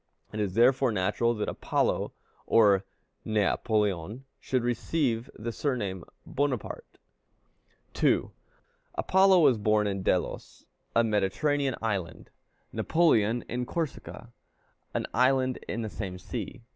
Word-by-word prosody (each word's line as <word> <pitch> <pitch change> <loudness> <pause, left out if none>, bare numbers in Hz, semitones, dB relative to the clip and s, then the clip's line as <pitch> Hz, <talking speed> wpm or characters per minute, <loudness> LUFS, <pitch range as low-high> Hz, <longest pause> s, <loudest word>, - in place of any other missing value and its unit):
It 105 - -4
is 100 -3 -1
therefore 125 +1 +4
natural 115 +4 +1
that 105 - -2
Apollo - - 0 0.4
or 100 -4 +5 0.4
Né 110 -2 +1
Apoleón 105 0 -1 0.2
should 130 -2 -1
receive 120 0 -1
the 115 +2 -4
surname 105 - -2
of - - -25
Bonaparte. 135 -5 -3 1.0
2. - - +2 0.6
Apollo 190 -1 +4
was 135 -7 +4
born 105 0 +2
in 100 -1 -2
Delos, - - -2 0.3
a 115 - +5
Mediterranean 115 +7 0
island; 100 -6 -3 0.4
Napoleon 120 -9 +2
in 125 +1 -3
Corsica, 135 -6 -5 0.6
an - - 0
island 130 +1 +2
in 115 +1 -3
the - - -3
same 100 -3 -5
sea. 115 +5 -6
115 Hz, 120 wpm, -28 LUFS, 105-130 Hz, 1.0 s, or